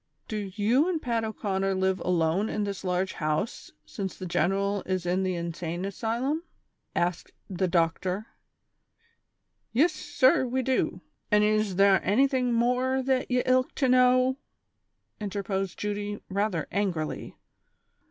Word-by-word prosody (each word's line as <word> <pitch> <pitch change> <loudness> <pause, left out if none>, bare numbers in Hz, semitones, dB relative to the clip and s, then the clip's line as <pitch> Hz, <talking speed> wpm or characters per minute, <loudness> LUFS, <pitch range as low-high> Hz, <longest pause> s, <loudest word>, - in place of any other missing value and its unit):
" - - -46
Do 210 -3 -4
you 240 - +3
and 340 -3 0
Pat 235 -5 -1
O 220 - -2
'Conner 195 -2 -1
live 190 0 +1
alone 180 +3 +1
in 210 - -1
this 200 -1 -4
large 185 0 0
house 155 +8 -2
since 195 -3 -5
the 185 - -6
general 195 +3 0
is 185 -1 -1
in 180 +2 +1
the 185 -1 0
insane 170 +1 -4
asylum?" 235 +9 -1 0.5
asked 175 0 -1
the 185 -1 -1
doctor. 180 +4 0 0.7
" 460 0 -44
Yis, 300 +9 +4
sir, 265 -3 +2
we 260 +2 -1
do; 260 +1 0 0.3
an' 210 -1 +4
is 215 -1 +2
thare 195 0 +5
anyting 255 +4 +2
morer 250 +3 +1
that 260 -1 0
ye 250 0 +2
lik 255 0 +2
to 270 - +1
know? 255 +1 +4 0.4
" - - -36
interposed 195 -2 -3
Judy, 205 0 -3
rather 195 -4 -1
angrily. 180 -6 -2
205 Hz, 145 wpm, -27 LUFS, 185-250 Hz, 0.7 s, thare